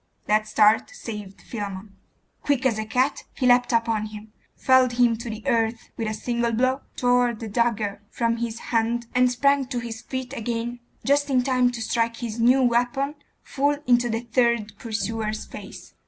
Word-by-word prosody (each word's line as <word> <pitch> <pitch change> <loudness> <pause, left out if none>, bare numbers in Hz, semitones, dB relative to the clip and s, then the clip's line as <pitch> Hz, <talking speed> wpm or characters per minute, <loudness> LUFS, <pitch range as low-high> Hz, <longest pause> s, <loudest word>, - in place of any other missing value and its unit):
That 215 0 +2
start 215 0 +4
saved 210 - -8
Philammon. 200 -2 -6 0.5
Quick 285 -2 0
as 230 -4 +2
a 215 - -2
cat, 255 +6 0
he 260 - -1
leapt 245 0 +4
upon 230 -2 +1
him, 210 0 -11 0.2
felled 260 -1 +4
him 240 -1 +3
to 235 +1 -6
the 215 0 -6
earth 225 0 0
with 225 - -3
a 215 - -2
single 235 +1 -1
blow, 255 +4 +1
tore 245 -1 +2
the 225 +1 -7
dagger 215 -2 0
from 230 -1 0
his 230 -1 -3 0.2
hand, 235 +1 +1
and 250 0 +4
sprang 280 +1 +2
to 255 -1 -4
his 230 -2 -5
feet 260 +1 -5
again 235 +1 -3 0.3
just 285 +1 +2
in 255 -2 +3
time 255 -1 +3
to 240 -2 -5
strike 230 0 0
his 235 -1 -5
new 250 +3 +5
weapon 245 +4 +1 0.3
full 285 +1 0
into 245 -2 +3
the 225 0 -1
third 235 -3 +1
pursuer's 220 -1 -3
face. - - -11
235 Hz, 175 wpm, -24 LUFS, 220-250 Hz, 0.5 s, new